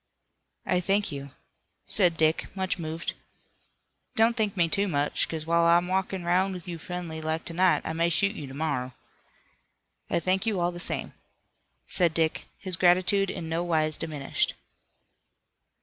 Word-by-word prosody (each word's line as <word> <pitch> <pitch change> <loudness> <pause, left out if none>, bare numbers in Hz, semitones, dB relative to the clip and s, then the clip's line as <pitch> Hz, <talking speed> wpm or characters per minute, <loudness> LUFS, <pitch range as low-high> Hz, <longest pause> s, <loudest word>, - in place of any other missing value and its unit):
"I 180 - +2
thank 195 +1 +1
you," 140 -1 -6 0.6
said 175 -5 +2
Dick, 155 0 +2
much 190 -1 -1
moved. 165 0 -4 1.0
"Don't 225 +1 +4
thank 210 -4 -1
me 170 -1 +4
too 200 +4 +1
much, 145 -4 0
'cause 160 -1 -4
while 170 +1 +3
I'm 170 +1 +4
walkin' 190 -1 -1
'roun' 185 +3 +2
with 180 -2 -8
you 170 -2 -5
friendly 175 -3 -5
like 160 +1 -2
to 170 - -5
night 180 +1 +3
I 160 - -2
may 165 +1 +1
shoot 200 +5 +1
you 145 - -6
to 135 - -9
morrow." 140 -5 -2 1.1
"I - - +1
thank 190 +5 0
you, 210 -4 +1
all 175 0 +1
the 175 - -8
same," - - -1 0.7
said 170 -3 +2
Dick, 160 -1 0
his 185 -3 -2
gratitude 185 +2 +4
in 165 - -5
nowise 160 -2 +1
diminished. 150 -4 -2
170 Hz, 160 wpm, -27 LUFS, 160-185 Hz, 1.1 s, Don't